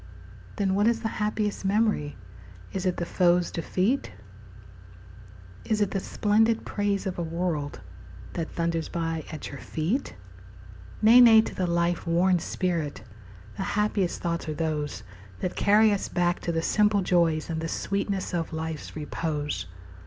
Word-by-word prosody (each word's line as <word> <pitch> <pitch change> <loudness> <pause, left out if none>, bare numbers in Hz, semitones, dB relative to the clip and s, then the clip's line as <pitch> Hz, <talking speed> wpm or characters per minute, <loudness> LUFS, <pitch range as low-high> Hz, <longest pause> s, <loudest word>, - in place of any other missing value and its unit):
Then 195 -2 +1
what 205 +3 +3
is 230 0 +2
the 225 - -1
happiest 210 -1 -1
memory? 200 -7 +1 0.6
Is 190 0 -1
it 180 - 0
the 170 - -2
foe's 175 0 +2
defeat? 190 - 0 1.5
Is 215 - 0
it 205 -2 +1
the 195 - 0
splendid 220 +4 +1
praise 205 -1 -1
of 185 -2 -3
a - - -1
world 165 -3 -3 0.5
That 165 -2 -3
thunders 165 -1 -2
by 165 -2 -3
at 155 - -6
your 140 - -8
feet? 185 - -2 0.9
Nay, 235 +3 +8
nay, 225 -2 +9
to - - -5
the 185 - -1
life 170 0 0
worn 175 +2 +3
spirit 165 -5 -2 0.5
The 195 - -2
happiest 210 -3 +1
thoughts 170 -1 -2
are 155 - -3
those 150 -2 -2 0.4
That 180 - -3
carry 210 +1 +5
us 200 - -2
back 175 -1 +1
to 170 - -2
the 165 0 -1
simple 210 0 +3
joys 170 -3 +2
And 160 -1 -3
the 165 - -2
sweetness 200 +2 -2
of 170 -2 -2
life's 160 -1 -5
repose. 150 - -3
175 Hz, 150 wpm, -27 LUFS, 165-205 Hz, 1.5 s, nay